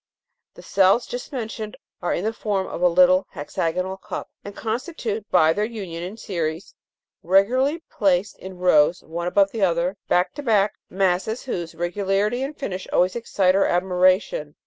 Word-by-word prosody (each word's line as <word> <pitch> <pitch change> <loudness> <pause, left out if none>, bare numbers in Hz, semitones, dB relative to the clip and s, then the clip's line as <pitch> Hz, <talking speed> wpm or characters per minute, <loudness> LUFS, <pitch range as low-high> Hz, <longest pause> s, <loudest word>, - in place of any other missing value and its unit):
The - - -13
cells 195 +5 +3
just 245 +4 -6
mentioned 220 -4 -5 0.2
are 175 - -1
in 215 +5 -1
form 200 -4 -1
of 175 - -6
a 180 - +6
little 180 +2 +4
hexagonal 175 +5 -2
cup, - - -7
and 205 0 -9
constitute 225 - -4
by 160 +1 +4
their 210 - -1
union 200 -7 -5
in 185 +5 -6
series, 175 -2 -4 0.5
regularly 255 - +2
placed 195 0 0
in 190 -1 -9
rows 175 -2 +3
one 170 +2 -4
above 195 +2 +3
the 225 - -4
other, 180 +1 +1
back 180 +1 +2
to 290 - -6
back, 210 -6 +2 0.2
masses 190 +4 0
whose 175 -10 -4
regularity 195 +6 0
and 280 +3 -4
finish 190 -8 -5
always 185 +1 +2
excite 195 -5 +1
our 195 - +3
admiration 185 -2 +2
(Jig. 150 - -26
190 Hz, 165 wpm, -23 LUFS, 180-215 Hz, 0.5 s, a